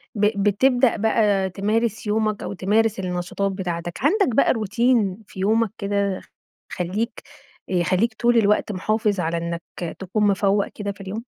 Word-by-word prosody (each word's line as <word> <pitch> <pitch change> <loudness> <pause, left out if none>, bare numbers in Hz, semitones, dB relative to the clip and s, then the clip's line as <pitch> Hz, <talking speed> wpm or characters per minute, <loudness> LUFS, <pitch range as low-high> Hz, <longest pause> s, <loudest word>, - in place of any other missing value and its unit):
ب 205 -1 +1
بتبدأ 245 +5 +3
بَقى 210 -3 +2
تمارس 215 +3 -1
يومك 215 -1 0
أو - - -4
تمارس 210 +3 +1
النشاطات 185 +2 -2
بتاعتك، 175 -3 -4
عندك 300 - +2
بَقى - - +4
روتين 220 -2 +1
في 190 - -11
يومك 220 +2 +2
كده 200 -2 -1 0.5
خليك 195 +6 -3 0.5
يخليك 185 +5 +1
طول 240 +2 +2
الوقت 210 -1 +2
محافظ 210 +1 0
على 170 0 -1
إنك 170 0 -5
تكون 205 +2 0
مفوق 200 0 +2
كده 205 -1 -5
في 195 - -12
اليوم؟ 200 +4 -5
205 Hz, 140 wpm, -22 LUFS, 190-220 Hz, 0.5 s, بَقى